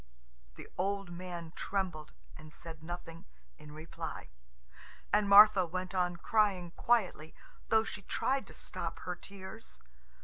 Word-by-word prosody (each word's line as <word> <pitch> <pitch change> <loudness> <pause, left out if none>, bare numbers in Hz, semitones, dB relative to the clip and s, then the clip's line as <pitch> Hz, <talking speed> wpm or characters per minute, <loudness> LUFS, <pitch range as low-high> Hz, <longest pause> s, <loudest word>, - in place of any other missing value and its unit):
The - - -10
old 195 -1 -1
man 175 -2 -6
trembled, 180 - -3 0.2
and 155 0 -12
said 160 0 -8
nothing 165 0 -8 0.3
in 150 - -12
reply. 155 +2 -7 0.8
And 205 -1 +3
Martha 205 -1 +9
went 185 +2 -4
on 180 -1 +1
crying 195 -3 +1
quietly, 185 -8 +1 0.3
though 220 0 +5
she 225 -2 -6
tried 265 +7 -1
to - - -12
stop - - -5
her 180 - -3
tears. 200 +4 -10
185 Hz, 130 wpm, -33 LUFS, 170-200 Hz, 0.8 s, Martha